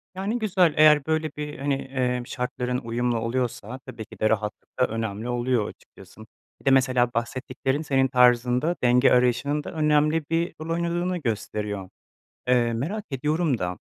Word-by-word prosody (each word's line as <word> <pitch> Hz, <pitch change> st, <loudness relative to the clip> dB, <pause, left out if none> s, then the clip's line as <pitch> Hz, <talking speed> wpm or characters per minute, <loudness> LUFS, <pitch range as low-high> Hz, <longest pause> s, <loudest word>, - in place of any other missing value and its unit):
Yani, 200 Hz, +6 st, -2 dB
güzel, 185 Hz, -7 st, +3 dB
eğer, 150 Hz, -2 st, +6 dB
böyle, 160 Hz, -1 st, 0 dB
bir, 150 Hz, -1 st, -5 dB
hani, 140 Hz, +1 st, 0 dB
emm, 125 Hz, -2 st, -2 dB
şartların 125 Hz, 0 st, -2 dB
uyumlu 120 Hz, -1 st, -1 dB
oluyorsa 120 Hz, +1 st, -3 dB
tabii 110 Hz, -1 st, -8 dB
ki -, -, -15 dB
de 110 Hz, -, +2 dB
rahatlık 105 Hz, -1 st, -3 dB
da 125 Hz, -, +4 dB
önemli 110 Hz, +1 st, -4 dB
oluyor 120 Hz, -2 st, 0 dB
açıkçası. -, -, -16 dB, 0.4 s
Bir -, -, -23 dB
de 135 Hz, -, +4 dB
mesela 125 Hz, -2 st, +3 dB
bahsettiklerin 130 Hz, +4 st, -2 dB
senin 135 Hz, -3 st, +2 dB
tarzında 125 Hz, +5 st, +3 dB
denge 125 Hz, +1 st, +5 dB
arayışının 125 Hz, +4 st, +2 dB
da -, -, -7 dB
önemli 150 Hz, 0 st, +2 dB
bir 165 Hz, +1 st, 0 dB
rol 160 Hz, -, -6 dB
oynadığını 175 Hz, +2 st, -1 dB
gösteriyor. 105 Hz, -, -3 dB, 0.6 s
Eee, 120 Hz, -2 st, +3 dB
merak 180 Hz, -, -3 dB
ediyorum 150 Hz, +1 st, 0 dB
da 90 Hz, -2 st, -3 dB
130 Hz, 155 wpm, -25 LUFS, 120-150 Hz, 0.6 s, eğer